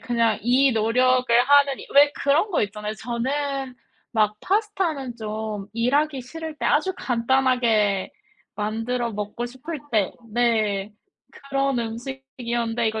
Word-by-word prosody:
그냥 230 -3 +1
이 260 +3 +4
노력을 250 +3 +2 0.2
하는 285 -2 +5
이 - - -10
왜 285 +1 +7
그런 295 +11 +1
거 350 - +1
있잖아요 210 +1 -4
저는 265 +3 -3 0.4
막 215 -2 +2
파스타는 370 - -1
좀 215 -2 -5
일하기 270 +5 +1
싫을 320 +4 -7
때 - - -2
아주 345 +6 +2
간단하게 235 -5 +1 0.4
만들어 225 +3 -2
먹고 210 +3 -4
싶을 280 +6 -7
때 210 -4 +1 0.2
네 215 -4 +1 0.6
그런 275 -2 +1
음식이었는데 235 -1 -3
이거 220 0 -3
245 Hz, 260 characters per minute, -24 LUFS, 220-275 Hz, 0.6 s, 왜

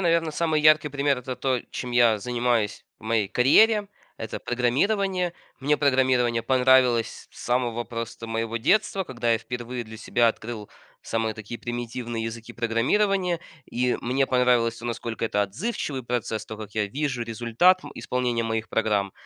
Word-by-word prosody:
наверное, 170 -3 +2
самый 160 -1 +1
яркий 155 -1 +5
пример 140 -1 0
это 125 0 -6
то, 130 -3 0
чем 125 - -5
я 120 -3 +4
занимаюсь 120 -2 -1
в 110 - -18
моей 110 -3 +1
карьере. 205 - +4 0.3
Это 110 -1 -5
программирование. 180 - 0 0.3
Мне 150 +2 +2
программирование 130 -4 +2
понравилось 125 -2 +3
с - - -16
самого 120 -1 0
просто 115 -1 -6
моего 115 0 -2
детства, 195 - +2
когда 120 -4 -1
я 115 - +2
впервые 120 +1 -5
для 110 0 -10
себя 115 +1 +2
открыл 110 -2 -5 0.3
самые 115 -1 -1
такие 110 +2 -8
примитивные 120 -1 -4
языки 115 +1 -6
программирования, 170 - +1 0.2
и 125 +1 0
мне 130 +3 +1
понравилось 125 -3 +2
то, 120 - -11
насколько 115 -1 -3
это 105 -2 0
отзывчивый 130 - -3
процесс, 120 -2 -2
то, 110 -1 -8
как 105 -1 -8
я 105 -1 +1
вижу 135 +1 -2
результат, 120 +11 +2
м, - - -8
исполнения 125 -2 -1
моих 110 -1 -2
программ. 105 -3 0
120 Hz, 155 wpm, -25 LUFS, 115-135 Hz, 0.3 s, яркий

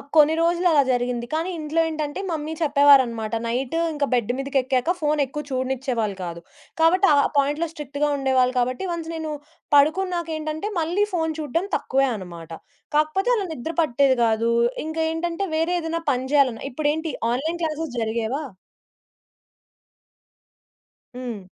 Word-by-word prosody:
కొన్ని 305 +1 +6
రోజులలా 340 -3 +3
జరిగింది 245 -1 0
కానీ 325 +4 -1
ఇంట్లో 310 +2 -1
ఏంటంటే 305 0 -4
మమ్మీ 315 0 -3
చెప్పేవారనమాట 275 -7 +4
నైట్ 245 +5 -2 0.2
ఇంక 290 -1 0
బెడ్ 245 -1 +1
మీదకేక్కాక 270 +2 0
ఫోను 300 -1 +1
ఎక్కువ 295 +3 -6
చూడనిచ్చేవాళ్ళు 255 -5 -1
కాదు. 170 -1 -6 0.4
కాబట్టి 360 +4 +4
ఆ! - - +5 0.2
పాయింట్లో 295 +4 +1
స్ట్రిక్ట్‌గా 295 0 -2
ఉండేవాళ్ళు 260 -2 +2
కాబట్టి 255 +7 -1
వన్స్ 330 -1 -4
నేను 315 -1 -4 0.4
పడుకున్నాకేంటంటే 315 +1 +1
మళ్ళీ 350 +6 +1
ఫోను 320 -2 0
చూడడం 320 +5 -1
తక్కువే 270 +1 +1
అనమాట. 170 -4 -9 0.4
కాకపోతే 310 +9 +2
అలా 410 -4 -1
నిద్ర 320 +4 -5
పట్టేది 265 -2 +2
గాదు. 225 +1 +2 0.3
ఇంక 315 +1 -5
ఏంటంటే 340 +3 -2
వేరే 325 +3 +1
ఏదైనా 330 +1 -3
పని 260 +1 -2
జేయాలన్న 270 -3 +2
ఇప్పుడేంటి 310 +3 -1 0.2
ఆన్‌లైన్ 320 +7 -2
క్లాసెస్ 310 -4 -3
జరిగేవా! 225 +6 -2 2.7
హ్మ్. 235 -6 -6
290 Hz, 130 wpm, -23 LUFS, 255-320 Hz, 2.7 s, కొన్ని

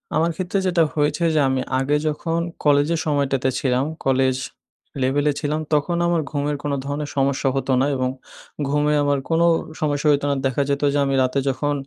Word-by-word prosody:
আমার 165 +2 +2
ক্ষেত্রে 185 +2 -1
যেটা 170 -2 +3
হয়েছে 150 +3 0
যে - - +4
আমি 130 -1 0 0.2
আগে 140 +2 +1
যখন 165 +2 -1 0.2
কলেজের 145 +3 +3
সময়টাতে 140 -3 +1
ছিলাম, 130 0 +1 0.2
কলেজ 130 -1 +2 0.7
লেভেলে 145 +3 +2
ছিলাম, 150 +1 -1
তখন 160 +4 +1
আমার 170 -2 +1
ঘুমের 145 0 -1
কোনো 145 -1 -1
ধরনের 145 +1 -3
সমস্যা 135 0 +1
হতো 135 0 -1
না - - +3
এবং 130 -1 0 0.6
ঘুমে 150 +1 +1
আমার 145 -1 +1
কোনো 165 +1 +3 0.4
সমস্যা 150 0 0
হইতো 145 0 +1
না। - - +1
দেখা 135 +2 +1
যেতো 140 +1 0
যে, - - +1
আমি 135 0 0
রাতে 130 +2 0
যখন 145 +2 -1
145 Hz, 175 wpm, -22 LUFS, 135-150 Hz, 0.7 s, যে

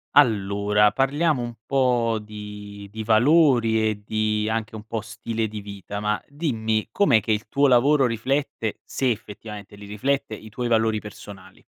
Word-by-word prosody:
Allora 105 -4 +4
parliamo 140 0 +1
un 120 0 -5
po' 125 -4 +2
di 105 -1 -9
di 110 +1 -5
valori 115 -2 +4
e 105 -1 -4
di 110 0 0
anche 110 0 -2
un 105 - -8
po' 115 0 -3
stile 110 +1 -3
di 105 0 -7
vita, 100 0 -7
ma 105 0 0
dimmi 110 -8 -1
com'è 160 - +4
che 110 - -2
il 110 +2 -1
tuo 140 0 +3
lavoro 135 +2 +4
riflette, 115 -1 -2
se 130 -2 0
effettivamente 105 -1 -8
li 100 0 -11
riflette, 110 +5 -1
i 110 0 -9
tuoi 120 +3 -3
valori 110 -2 +2
personali? 100 -2 -12
110 Hz, 160 wpm, -24 LUFS, 105-125 Hz, -, Allora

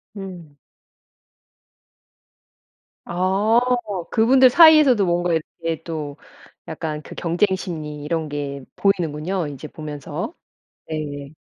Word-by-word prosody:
음. 180 -7 -9 2.5
아 190 +6 +2 0.5
그 220 -1 +3
분들 260 +1 +7
사이에서도 300 - +7
뭔가 175 0 +1
이렇게 165 0 -3
또 150 -3 -5 0.5
약간 155 -1 -4
그 - - -11
경쟁 180 +3 +1
심리 150 -5 -6
이런 160 0 -2
게 140 -1 -5
보이는군요 175 -2 0
이제 145 +1 -8
보면서. 150 - -6 0.6
네. 145 -2 -5
165 Hz, 195 characters per minute, -22 LUFS, 150-195 Hz, 2.5 s, 분들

